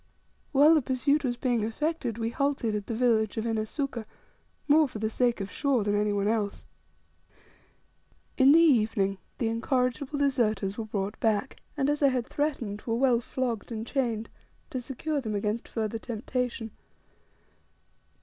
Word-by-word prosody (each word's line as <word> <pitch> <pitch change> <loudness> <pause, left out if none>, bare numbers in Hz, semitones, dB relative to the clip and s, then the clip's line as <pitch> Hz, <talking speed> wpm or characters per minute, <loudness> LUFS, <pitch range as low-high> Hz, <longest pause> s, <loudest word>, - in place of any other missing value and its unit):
While 290 +3 +6
the 310 - +4
pursuit 280 +4 +1
was 245 -2 -1
being 240 -3 0
effected 245 +1 -2
we 230 0 -2
halted 275 -5 0
at 210 -1 -3
the 230 - -2
village 225 -3 +2
of 220 - -1
Inesuka, 230 +2 -2 0.6
more 305 +1 +5
for 250 - -8
the 220 +1 -2
sake 240 0 +1
of 195 0 -5
Shaw 275 -6 +1
than 205 0 0
any 210 0 +1
one 200 0 0
else. 215 -2 -1 1.7
In 265 +1 +6
the 320 - +7
evening 215 - +3 0.2
the 230 - 0
incorrigible 250 +4 -1
deserters 230 -8 +1
were 225 - -4
brought 205 -1 -3
back, 220 +2 0 0.2
and, 275 -1 +1
as 295 +1 0
I 280 - +6
had 255 -3 0
threatened, 245 -10 -2
were 225 - +1
well 250 -1 +3
flogged 240 -2 -3
and 220 0 -4
chained, 235 -5 -2 0.4
to 255 - -3
secure 285 +4 -3
them 220 -4 -3
against 210 +3 -2
further 225 0 -3
temptation. 235 0 -3
235 Hz, 160 wpm, -28 LUFS, 215-270 Hz, 1.7 s, the